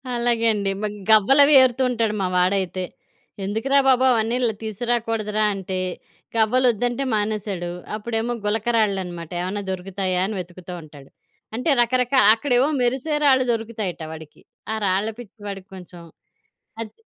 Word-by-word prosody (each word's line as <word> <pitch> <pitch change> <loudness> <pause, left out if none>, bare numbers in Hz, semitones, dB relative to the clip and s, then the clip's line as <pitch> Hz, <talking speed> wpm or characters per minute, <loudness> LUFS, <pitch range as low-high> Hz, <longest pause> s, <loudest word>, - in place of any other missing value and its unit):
అలాగే 235 -1 0
అండి. 200 -2 -1
మ - - -1 0.2
గవ్వలు 220 +7 +6
అవి 300 - +4
ఏరుతూంటాడు 245 -3 +1
మా 185 - +1
వాడైతే. 185 0 0 0.6
ఎందుకురా 225 +8 +1
బాబు! 260 -1 +4
అవన్నీ 230 0 +1
ల్ 220 - -1
తీసుకురాకూడదురా 220 -1 -1
అంటే, 190 -1 -4 0.6
గవ్వలొద్దంటే 245 +2 +2
మానేసాడు. 205 -4 -2 0.2
అప్పుడేమో 225 +2 -2
గులక 220 +2 -1
రాళ్ళు 200 -3 +2
అనమాట 175 -2 -8
ఏమన్నా 190 +3 -3
దొరుకుతాయా 185 0 -2
అనే 215 +1 -4
వెతుకుతూ 180 0 -9
ఉంటాడు. 145 -3 -14 0.5
అంటే 255 +7 -1
రకరకా 250 +2 +2
అక్కడ 255 +4 -4
ఏమో 275 +4 +3
మెరిసే 265 +5 0
రాళ్ళు 260 -2 +5
దొరుకుతాయట 220 -6 -4
వాడికి. 160 -1 -11 0.3
ఆ - - -1
రాళ్ళ 195 +3 +1
పిచ్చి 220 -2 -12
వాడికి 195 -1 -7
కొంచెం 180 -1 -12 0.8
అది 220 -2 -6
215 Hz, 135 wpm, -22 LUFS, 190-240 Hz, 0.8 s, గవ్వలు